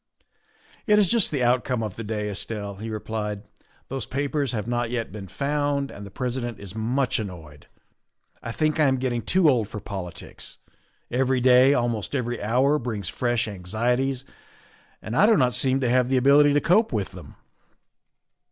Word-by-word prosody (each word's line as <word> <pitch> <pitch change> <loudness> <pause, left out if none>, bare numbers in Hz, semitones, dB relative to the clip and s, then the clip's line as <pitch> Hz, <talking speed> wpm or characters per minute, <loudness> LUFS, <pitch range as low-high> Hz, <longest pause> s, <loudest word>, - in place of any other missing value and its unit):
"It 210 -1 +5
is 205 -2 +4
just 230 +1 +3
the 140 -4 -1
outcome 125 -1 +1
of 105 -4 -4
the 115 - -6
day, 105 -1 -3
Estelle," 100 0 -4
he 110 +3 -6
replied; 105 -1 -4 0.2
" - - -35
those 135 -3 -5
papers 140 +1 -1
have 110 -4 -3
not 120 0 -1
yet 120 -1 -3
been 100 -3 -8
found, 145 +2 -1
and 100 - -9
the 100 - -9
President 120 +1 -4
is 100 -2 -8
much 125 +5 0
annoyed. 80 -8 -8 0.7
I 115 - -5
think 155 +5 0
I 150 - +5
am 130 0 +2
getting 125 -2 -1
too 180 - +3
old 120 -7 +2
for 105 - -6
politics; 95 -4 -7 0.5
every 130 +1 +1
day, 130 +2 +6
almost 120 -1 -1
every 120 -2 -2
hour, 130 +8 +2
brings 110 -7 -4
fresh 120 -2 0
anxieties, 120 +7 -1 0.8
and 110 - -4
I 205 - +5
do 220 -2 +5
not 125 -2 +3
seem 130 0 +2
to 125 - +1
have 125 0 +3
the 130 - +2
ability 140 +3 +5
to 145 - +3
cope 215 +6 +3
with 105 -4 -2
them." - - -12
125 Hz, 180 wpm, -25 LUFS, 110-135 Hz, 0.8 s, day